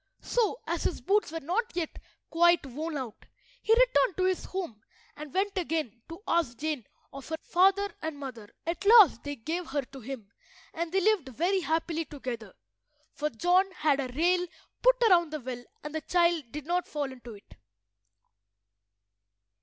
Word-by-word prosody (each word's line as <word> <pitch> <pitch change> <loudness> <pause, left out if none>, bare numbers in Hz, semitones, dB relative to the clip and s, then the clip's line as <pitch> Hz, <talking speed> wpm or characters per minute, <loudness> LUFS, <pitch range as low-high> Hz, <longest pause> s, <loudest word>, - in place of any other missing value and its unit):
So, 460 -1 +1
as - - -2
his - - -1
boots 410 -3 +1
were 325 0 -4
not 395 - -1
yet 340 -3 -3 0.3
quite 345 -1 +4
worn 300 +4 -4
out, 250 -5 -7 0.3
he - - -1
returned - - +4
to 370 - +1
his 370 -1 +1
home 345 - -5 0.3
and 295 -1 -8
went 390 +2 0
again 310 - -2
to 335 +5 -9
ask 315 -9 +1
Jane 300 -8 -3 0.3
of 275 +1 -9
her 320 - -1
father 390 +3 +3
and 315 -2 -4
mother. 245 -7 -8 0.2
At 335 +3 -3
last 410 - +7
they 285 0 -4
gave 320 +8 -4
her 280 +1 -1
to 270 +1 -12
him, 235 -5 -8 0.4
and 335 0 -3
they 385 +1 +2
lived 380 -9 +2
very 350 - +1
happily 325 0 -1
together, 260 -5 -7 0.6
for 300 0 -1
John 355 - +3
had 300 -4 +2
a 270 - -1
rail 355 +2 +3 0.3
put - - +6
round 345 -5 +4
the 305 - -2
well 245 -2 -6 0.2
and 300 - -6
the 315 - -2
child 340 -1 +2
did 300 -1 -6
not 355 +2 0
fall 290 -3 -3
into 245 -3 -10
it. 200 - -17
325 Hz, 170 wpm, -29 LUFS, 275-360 Hz, 0.6 s, last